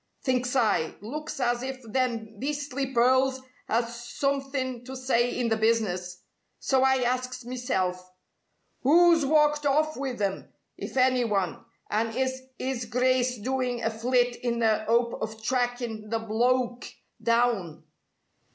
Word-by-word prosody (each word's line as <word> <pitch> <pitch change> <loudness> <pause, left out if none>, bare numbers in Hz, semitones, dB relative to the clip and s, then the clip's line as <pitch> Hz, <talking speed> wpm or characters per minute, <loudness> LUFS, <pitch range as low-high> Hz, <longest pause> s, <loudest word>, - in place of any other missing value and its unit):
Thinks 250 -1 0
I, 215 -10 +2
looks 300 +7 -6
as 240 -1 +1
if 265 0 -5
them 225 -2 -2
beastly 280 -1 -2
pearls 260 +2 +3 0.3
has 235 +1 -1
somethin' 270 -1 -2
to 265 +1 -7
say 255 -2 +1
in 245 -2 0
the 225 - +1
business. 190 -6 0 0.3
So 265 -1 +1
I 265 -1 +3
asks 250 0 -2
meself: 185 -8 -2 0.7
'Oo's 330 +1 +5
walked 300 0 +3
off 310 +2 +2
with 265 -3 -4
'em, 195 -2 -2 0.2
if - - -7
any 255 -1 +4
one, 195 -6 -1 0.3
and 225 +1 0
is 260 0 -1 0.2
'is 255 -2 -3
Grice 250 +1 +1
doin' 250 +1 -2
a 225 - +1
flit 245 +2 +1
in 240 -1 -2
the 220 -2 +1
'ope 235 +1 +1
of 220 0 -5
trackin' 245 -3 -1
the 225 - 0
bloke 240 +2 0 0.4
down? 230 -10 +1
245 Hz, 135 wpm, -27 LUFS, 225-260 Hz, 0.7 s, Oo's